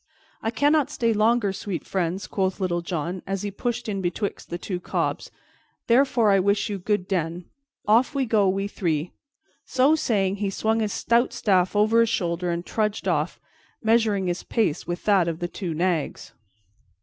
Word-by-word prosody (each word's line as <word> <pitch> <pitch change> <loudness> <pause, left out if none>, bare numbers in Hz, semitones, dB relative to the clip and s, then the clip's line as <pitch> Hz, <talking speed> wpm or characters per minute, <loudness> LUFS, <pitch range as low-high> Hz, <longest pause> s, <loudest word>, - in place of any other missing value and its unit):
"I 220 - -1
cannot 285 +5 +2
stay 230 -1 0
longer, 215 -1 +2
sweet 195 -2 -5
friends," 185 0 -2
quoth 190 -1 -1
Little 175 -2 0
John, 170 +1 -3
as 195 0 -2
he 205 - -3
pushed 240 +4 -3
in 200 -2 -2
betwixt 185 +3 -3
the 175 - -3
two 180 0 -4
cobs, - - -2 0.6
"therefore 235 -3 +4
I 195 - +5
wish 200 +3 +1
you 200 - -3
good 205 0 -1
den. 175 -2 -2 0.4
Off 235 +7 +3
we 270 -1 +1
go, 210 -4 +3
we 195 +1 -1
three." 165 -5 -2 0.5
So 265 +4 +3
saying, 200 -10 +1
he 200 -1 -1
swung 220 +3 0
his 215 -2 -1
stout 235 +5 +1
staff 185 -2 +2
over 215 +2 +4
his 230 -1 +4
shoulder 175 -1 -1
and 170 0 -2
trudged 215 -1 -1
off, - - 0 0.4
measuring 220 -3 +2
his 175 0 -2
pace 200 -9 -1
with 175 0 -4
that 195 -5 +4
of 165 -1 -2
the 175 0 -3
two 175 -2 -5
nags. 170 -2 -1
200 Hz, 175 wpm, -24 LUFS, 180-225 Hz, 0.6 s, I